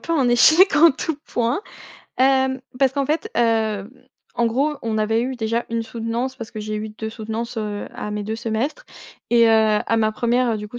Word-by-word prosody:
peu 335 - -4
un 270 -6 +2
échec 315 +10 +6
en 330 +2 +7
tout 300 +3 -3
point. 240 +7 -1 0.6
Hem, 265 0 +2 0.2
parce 270 -2 +3
qu'en 280 0 0
fait, 305 +3 -2
heu, 220 -3 +1 0.4
en 235 - +1
gros 280 +6 0
on 225 -1 -2
avait 220 +1 +1
eu 260 +1 -3
déjà 230 +1 -2
1 230 0 -2
soutenance, 230 +3 -3
parce 230 -3 -8
que 215 - -7
j'ai 215 0 -4
eu 215 +1 -4
2 220 +1 -6
soutenances, 225 +1 -5
heu, 210 -1 -4
à 210 - -6
mes 210 0 -3
2 220 +2 -4
semestres. 235 - -3 0.4
Et, 235 -1 +5
heu, 220 -1 +4
à 230 - +1
ma 215 -1 +1
1re, 240 +1 +1
heu, 220 - -1
du 210 - -6
coup 240 +3 -8
230 Hz, 210 wpm, -21 LUFS, 220-260 Hz, 0.6 s, en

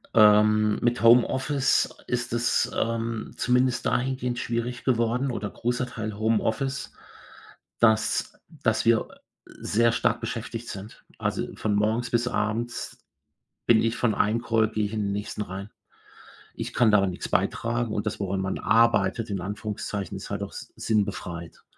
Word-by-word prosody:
Ähm, 105 0 +5
mit 120 0 +1
Homeoffice 130 +4 +4 0.2
ist 120 -1 -2
es, 120 +1 +1
ähm, 115 -1 -2
zumindest 125 0 +2
dahingehend 125 -1 -1
schwierig 120 +1 -3
geworden 125 +1 +1
oder 105 -3 -3
großer 125 +2 -2
Teil 110 -4 -5
Homeoffice, 115 +5 -1 0.9
dass 110 -2 +2 0.2
dass - - -1
wir, 115 -1 +3 0.4
äh, - - -15
sehr 115 +2 +2
stark 115 0 +1
beschäftigt 115 0 -5
sind, 100 +3 -9
also, - - -1
von 105 -1 -1
morgens 110 +4 +1
bis 120 0 +1
abends 115 +1 -3 0.6
bin 115 -2 +6
ich 115 +1 0
von 120 -3 +1
einem 110 +3 +1
Call 110 -2 +2
gehe 110 -1 -1
ich 100 - -7
in 110 -1 -1
den 100 - -1
nächsten 105 +1 -4
rein. 100 +1 -7 0.8
Ich - - -6
kann 115 -2 +4
daran 100 -2 +4
nichts 90 - -6
beitragen 115 -1 0
und 105 - -2
das, 110 - -3
woran 95 -1 -1
man 95 0 -2
arbeitet, 115 +1 +2
in 100 - -2
Anführungszeichen, 105 0 -4
ist - - -8
halt - - -3
auch - - -5
si - - -8
sinnbefreit, 95 -6 -2
115 Hz, 150 wpm, -26 LUFS, 105-120 Hz, 0.9 s, bin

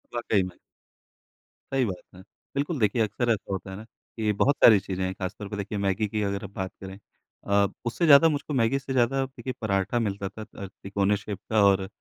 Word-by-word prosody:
वाकई 110 -5 +1
में। 90 -1 -8 1.2
सही 135 -2 +3
बात 95 -5 -4
है। 90 - -12 0.3
बिल्कुल, 145 +2 -1
देखिए 110 +1 +2
अक्सर 115 +3 -1
ऐसा 100 -2 -2
होता 95 0 -4
है - - -6
ना 110 - -9
कि 110 -1 -4
बहुत 140 +8 +2
सारी 110 -3 +9
चीज़ें 95 0 -4
हैं 95 - -2
खास 95 +1 -4
तौर 105 - -6
पे 105 - -5
देखिए 100 +1 -4
मैगी 100 +2 0
की 105 +1 -2
अगर 100 0 -2
आप 100 - -6
बात 95 -1 -4
करें 95 0 -8 0.5
अ, 100 0 +4 0.2
उससे 120 +9 0
ज़्यादा 155 +2 +8
मुझको 145 0 -3
मैगी 125 +2 +2
से 135 -1 -5
ज़्यादा 130 +2 +2
देखिए 130 -1 -7
पराठा 100 +2 0
मिलता 100 -3 -2
था 110 - -10
अ, 100 -3 -9 0.2
तिकोने 100 +1 +1
शेप 105 -1 -6
का 110 -2 +4
और 95 -1 +3
105 Hz, 215 wpm, -26 LUFS, 100-120 Hz, 1.2 s, सारी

